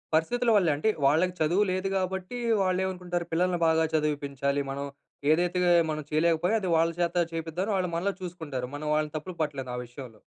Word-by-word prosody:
పరిస్థితుల 240 Hz, +10 st, +1 dB
వల్లే 180 Hz, -6 st, +4 dB
అంటే, 155 Hz, +10 st, +1 dB, 0.2 s
వాళ్ళకి 165 Hz, +6 st, +3 dB
చదువు 170 Hz, +6 st, +3 dB
లేదు 185 Hz, +1 st, -1 dB
కాబట్టి, 190 Hz, +4 st, -3 dB, 0.3 s
వాళ్ళు 185 Hz, -1 st, +1 dB
ఏమనుకుంటారు? 180 Hz, -2 st, -3 dB
పిల్లల్ని 175 Hz, +1 st, +1 dB
బాగా 160 Hz, 0 st, +3 dB
చదివిపించాలి. 140 Hz, -2 st, 0 dB
మనం 140 Hz, +1 st, -4 dB, 0.5 s
ఏదైతే 175 Hz, +3 st, +2 dB, 0.3 s
మనం 155 Hz, 0 st, -2 dB
చేయలేకపోయా 165 Hz, +5 st, +2 dB
అది 185 Hz, -, -2 dB
వాళ్ళ 165 Hz, +1 st, +3 dB
చేత 175 Hz, 0 st, 0 dB, 0.2 s
చేపిద్దాం. 165 Hz, +4 st, -3 dB
వాళ్ళు 185 Hz, -2 st, 0 dB
మనలో 190 Hz, +4 st, 0 dB
చూసుకుంటారు. 160 Hz, -8 st, -5 dB
మనం 150 Hz, +1 st, -5 dB
వాళ్ళని 150 Hz, 0 st, 0 dB
తప్పులు 170 Hz, +4 st, -5 dB
పట్టలేదు 140 Hz, -4 st, -3 dB
ఆ -, -, -4 dB
విషయంలో. 120 Hz, -2 st, -11 dB
165 Hz, 170 wpm, -28 LUFS, 150-185 Hz, 0.5 s, వల్లే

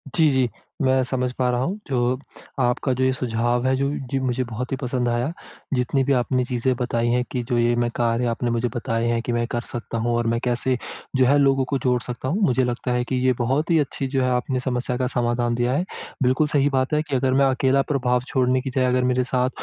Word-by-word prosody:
जी, 160 Hz, -3 st, +5 dB
जी। 130 Hz, -2 st, +2 dB, 0.3 s
मैं 130 Hz, -1 st, +3 dB
समझ 125 Hz, 0 st, -1 dB
पा 125 Hz, 0 st, 0 dB
रहा 125 Hz, 0 st, +1 dB
हूँ, 195 Hz, +8 st, -2 dB
जो 125 Hz, -1 st, 0 dB, 0.4 s
आपका 125 Hz, +1 st, +1 dB
जो 130 Hz, -, -1 dB
ये 130 Hz, -, +3 dB
सुझाव 120 Hz, 0 st, 0 dB
है, 130 Hz, -, +3 dB
जो 140 Hz, +1 st, 0 dB, 0.2 s
जी, 135 Hz, -, +1 dB
मुझे 130 Hz, -1 st, 0 dB
बहुत 120 Hz, +2 st, -5 dB
ही 135 Hz, -, -1 dB
पसंद 125 Hz, -1 st, -1 dB
आया। 120 Hz, +6 st, 0 dB, 0.4 s
जितनी 130 Hz, +2 st, +1 dB
भी 140 Hz, +1 st, +2 dB
आपने 125 Hz, 0 st, +1 dB
चीज़ें 125 Hz, +1 st, 0 dB
बताई 120 Hz, -1 st, 0 dB
हैं 125 Hz, +1 st, +2 dB
कि 125 Hz, -2 st, -2 dB
जो 120 Hz, -, +1 dB
ये 120 Hz, 0 st, +3 dB
मैं 120 Hz, 0 st, +1 dB
कार्य 120 Hz, 0 st, +1 dB
आपने 120 Hz, +1 st, -1 dB
मुझे 115 Hz, +1 st, 0 dB
बताए 115 Hz, -1 st, -1 dB
हैं 115 Hz, 0 st, +1 dB
कि 120 Hz, -, -3 dB
मैं 120 Hz, 0 st, +1 dB
कर 120 Hz, -, -1 dB
सकता 115 Hz, -1 st, -5 dB
हूँ 120 Hz, +1 st, 0 dB
और 120 Hz, 0 st, 0 dB
मैं 115 Hz, 0 st, +1 dB
कैसे 125 Hz, +1 st, 0 dB, 0.4 s
जो 130 Hz, -1 st, +4 dB
है 140 Hz, +3 st, +4 dB
लोगों 135 Hz, -1 st, +3 dB
को 140 Hz, +2 st, -1 dB
जोड़ 125 Hz, -1 st, +2 dB
सकता 125 Hz, +2 st, -5 dB
हूँ, 180 Hz, +10 st, 0 dB
मुझे 130 Hz, -3 st, +2 dB
लगता 125 Hz, 0 st, -2 dB
है 125 Hz, 0 st, +1 dB
कि 125 Hz, +2 st, -3 dB
ये 130 Hz, -, +4 dB
बहुत 135 Hz, +8 st, 0 dB
ही 165 Hz, -, +5 dB
अच्छी 135 Hz, -1 st, -2 dB
जो 135 Hz, 0 st, 0 dB
है, 130 Hz, -, +1 dB
आपने 125 Hz, +1 st, 0 dB
समस्या 125 Hz, -1 st, -1 dB
का 130 Hz, -1 st, 0 dB
समाधान 120 Hz, -1 st, 0 dB
दिया 120 Hz, +1 st, +1 dB
है। 175 Hz, +6 st, 0 dB, 0.4 s
बिल्कुल 130 Hz, +4 st, +3 dB
सही 145 Hz, -1 st, +2 dB
बात 130 Hz, +2 st, 0 dB
है 150 Hz, -, +3 dB
कि 145 Hz, -3 st, -3 dB
अगर 130 Hz, 0 st, +1 dB
मैं 135 Hz, +1 st, +4 dB
अकेला 135 Hz, +1 st, +2 dB
प्रभाव 125 Hz, -3 st, +1 dB
छोड़ने 130 Hz, 0 st, +1 dB
की 135 Hz, -, -4 dB
जगह 130 Hz, -1 st, +1 dB
अगर 125 Hz, 0 st, +2 dB
मेरे 125 Hz, 0 st, +2 dB
साथ 125 Hz, 0 st, 0 dB
125 Hz, 250 wpm, -23 LUFS, 120-130 Hz, 0.4 s, जी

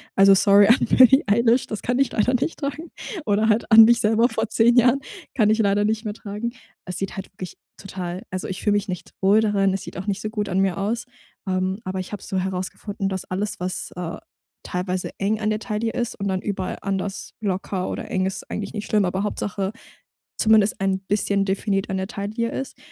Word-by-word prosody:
Also, 195 Hz, 0 st, +7 dB
sorry 200 Hz, 0 st, +6 dB
an 235 Hz, -, +5 dB
Billy 260 Hz, +2 st, +6 dB
Eilish, 235 Hz, +4 st, +3 dB
das 215 Hz, -, -5 dB
kann 245 Hz, +1 st, -1 dB
ich 275 Hz, -, +2 dB
leider 235 Hz, +4 st, +1 dB
nicht 260 Hz, +6 st, -1 dB
tragen 295 Hz, +3 st, -5 dB, 0.3 s
oder 210 Hz, +2 st, +2 dB
halt 220 Hz, +2 st, +1 dB
an 220 Hz, 0 st, +10 dB
mich 235 Hz, 0 st, +4 dB
selber 220 Hz, +2 st, +3 dB
vor 225 Hz, -3 st, -2 dB
10 235 Hz, +2 st, +4 dB
Jahren. 245 Hz, +2 st, +5 dB, 0.3 s
Kann 215 Hz, -4 st, +3 dB
ich 220 Hz, +1 st, +2 dB
leider 205 Hz, 0 st, +2 dB
nicht 220 Hz, +1 st, 0 dB
mehr 210 Hz, -2 st, -3 dB
tragen. 210 Hz, +2 st, -5 dB, 0.3 s
Es 180 Hz, 0 st, -5 dB
sieht 195 Hz, -1 st, -4 dB
halt 195 Hz, -, -7 dB
wirklich 185 Hz, -2 st, -8 dB, 0.2 s
total 185 Hz, 0 st, -6 dB
also, 185 Hz, 0 st, -4 dB
ich 190 Hz, -, -4 dB
fühle 210 Hz, -, +2 dB
mich 205 Hz, 0 st, 0 dB
nicht 180 Hz, -2 st, -6 dB
wohl 200 Hz, +3 st, +5 dB
darin, 200 Hz, -3 st, +2 dB
es 195 Hz, -, -3 dB
sieht -, -, -9 dB
auch 190 Hz, +3 st, -6 dB
nicht 200 Hz, 0 st, -1 dB
so 215 Hz, -, -3 dB
gut 210 Hz, -2 st, -3 dB
an 185 Hz, +1 st, 0 dB
mir 195 Hz, -1 st, +1 dB
aus, 210 Hz, +4 st, -2 dB, 0.4 s
ähm, 185 Hz, +1 st, -1 dB
aber 185 Hz, 0 st, -3 dB
ich 185 Hz, -, -9 dB
habe 205 Hz, -, -6 dB
so 190 Hz, -, -3 dB
herausgefunden, 190 Hz, +2 st, -3 dB
dass 190 Hz, -1 st, -3 dB
alles, 200 Hz, +2 st, -3 dB
was, 180 Hz, 0 st, -3 dB
äh, 175 Hz, -2 st, -5 dB, 0.5 s
teilweise 180 Hz, 0 st, -3 dB
eng 210 Hz, +2 st, 0 dB
an 215 Hz, 0 st, 0 dB
der 215 Hz, -, -1 dB
Taille 225 Hz, 0 st, -2 dB
ist 240 Hz, -1 st, -2 dB
und 200 Hz, -, -2 dB
dann 190 Hz, -1 st, -1 dB
überall 190 Hz, -3 st, -3 dB
anders 195 Hz, 0 st, -3 dB
locker 190 Hz, -2 st, -2 dB
oder -, -, -5 dB
eng 185 Hz, -1 st, +1 dB
ist, 190 Hz, -, -5 dB
eigentlich 200 Hz, -1 st, -4 dB
nicht 210 Hz, -2 st, -5 dB
schlimm, 210 Hz, -2 st, +2 dB
aber 190 Hz, +2 st, -1 dB
Hauptsache, 200 Hz, -1 st, -2 dB, 0.7 s
zumindest 215 Hz, -2 st, +3 dB
ein 190 Hz, 0 st, +1 dB
bisschen 200 Hz, 0 st, 0 dB
definiert 195 Hz, 0 st, -1 dB
an 190 Hz, -, -1 dB
der 190 Hz, 0 st, -2 dB
Taille 230 Hz, +1 st, -3 dB
ist. 270 Hz, -, -5 dB
205 Hz, 215 wpm, -23 LUFS, 190-220 Hz, 0.7 s, an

